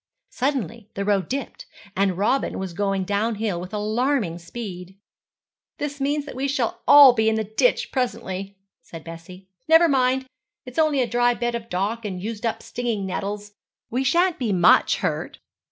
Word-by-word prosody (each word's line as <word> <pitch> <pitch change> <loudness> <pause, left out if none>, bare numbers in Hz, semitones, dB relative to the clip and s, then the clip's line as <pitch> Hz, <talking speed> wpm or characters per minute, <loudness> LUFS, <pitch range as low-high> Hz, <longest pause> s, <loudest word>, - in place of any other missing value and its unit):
Suddenly 235 - -2
the 200 - -2
road 200 -2 +1
dipped, 270 -1 -5 0.3
and 195 -2 +1
Robin 235 +8 0
was 190 -2 -5
going 195 +1 -1
downhill 205 -1 -1
with 180 - -8
alarming 215 - -1
speed. 185 -1 -8 0.8
'This 285 -1 -5
means 290 +1 0
that - - -8
we 265 +2 -2
shall 265 -4 -1
all 285 -3 +9
be 220 -2 +2
in 220 - +1
the 220 - 0
ditch 220 - +1
presently,' 200 -6 -3 0.2
said 165 -2 -11
Bessie. 170 +3 -11 0.2
'Never 325 +1 +6
mind. 260 -2 +2 0.4
It's 250 +4 -5
only 305 -4 +3
a - - -2
dry 240 +1 +2
bed 240 0 -2
of 230 -1 -5
dock 205 +6 -2
and 190 -4 -4
used 220 +3 -4
up 225 - -3
stinging 230 -5 -3
nettles. 205 +2 -4 0.4
We 255 +3 0
shan't 345 +5 +2
be 235 -5 -1
much 180 -3 +4
hurt.' - - -2
220 Hz, 170 wpm, -23 LUFS, 195-260 Hz, 0.8 s, all